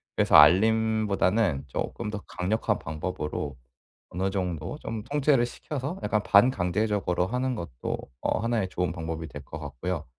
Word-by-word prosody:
그래서 - - +3
알림보다는 105 0 +4
쪼끔 115 - -4
더 105 -1 -5
강력한 100 +5 -1
방법으로 75 -2 -4 0.5
어느 95 +2 -1
정도 90 - -3
좀 115 -5 -5
통제를 140 -1 +2
시켜서 145 +7 -5
약간 105 -1 +1
반강제적으로 100 -3 +2
하는 125 +3 -1
것도 80 - -4 0.2
어 - - 0
하나의 115 -4 0
좋은 90 -2 -1
방법이 80 -1 -5
될 75 -2 -9
것 - - -8
같고요. 85 +2 -4
100 Hz, 325 characters per minute, -27 LUFS, 85-115 Hz, 0.5 s, 알림보다는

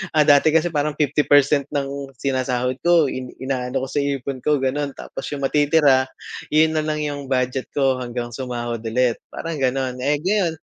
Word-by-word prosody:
ah, 150 - +6
dati 145 +2 +5
kasi 165 +1 +2
parang 150 -1 -1
50% 145 -1 +3
ng 140 0 -3
sinasahod 130 -1 -1
ko 170 -5 +3
in 130 -1 -6
inaano 130 -1 -2
ko - - -3
sa 145 - 0
ipon 140 -2 -2
ko 150 +3 +2
gano'n. 140 +1 -1
Tapos - - -7
yung 140 - -6
matitira, 145 -2 +3 0.4
'yon 155 +1 +3
na - - -1
lang 150 0 -1
yung 145 -2 -4
budget 130 0 -1
ko 135 -2 +2
hanggang 120 -1 -5
sumahod 120 -2 -4
ulit, 120 -1 +1
parang 165 -3 -5
gano'n, 130 -1 -1
eh. 145 +3 +1
Ngayon, 190 -4 +1
140 Hz, 175 wpm, -21 LUFS, 130-150 Hz, 0.4 s, ah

